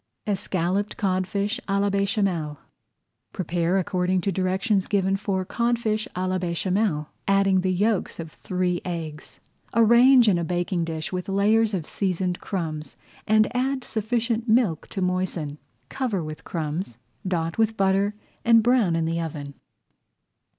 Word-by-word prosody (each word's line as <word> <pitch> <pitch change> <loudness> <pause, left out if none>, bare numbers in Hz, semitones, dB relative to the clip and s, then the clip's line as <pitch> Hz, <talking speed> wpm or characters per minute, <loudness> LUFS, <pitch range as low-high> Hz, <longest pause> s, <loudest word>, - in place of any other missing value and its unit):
ESCALLOPED 195 -1 -1
CODFISH 195 +1 0
À 195 0 +2
LA 200 0 +1
BÉCHAMEL 195 -7 0 0.8
Prepare 175 +1 0
according 185 0 +1
to 195 +2 -1
directions 190 +2 0
given 195 -1 +1
for 195 -2 -2
Codfish 235 -1 0
à 185 +1 -1
la 185 0 0
Béchamel, 180 -1 0 0.2
adding 195 -1 +3
the 185 - 0
yolks 205 +1 0
of 160 -1 -6
three 180 -1 -1
eggs. 165 -4 -6 0.4
Arrange 235 +2 +6
in 185 -4 +4
a - - -1
baking 175 +1 -1
dish 160 +1 -4
with 180 +1 -3
layers 210 +2 +3
of 170 -5 -3
seasoned 185 -1 -1
crumbs, 160 -6 -4 0.3
and 215 +3 +3
add 260 +1 0
sufficient 230 +1 -1
milk 220 -9 +2
to 190 - -3
moisten. 180 -5 -2 0.3
Cover 235 -10 -2
with 155 0 -7
crumbs, 155 - -4 0.3
dot 165 0 -1
with 220 0 +2
butter, 195 +1 +2 0.3
and 230 -1 +5
brown 235 -8 +3
in 165 -1 0
the 165 +1 -1
oven. 145 -3 -5
190 Hz, 140 wpm, -25 LUFS, 170-215 Hz, 0.8 s, Arrange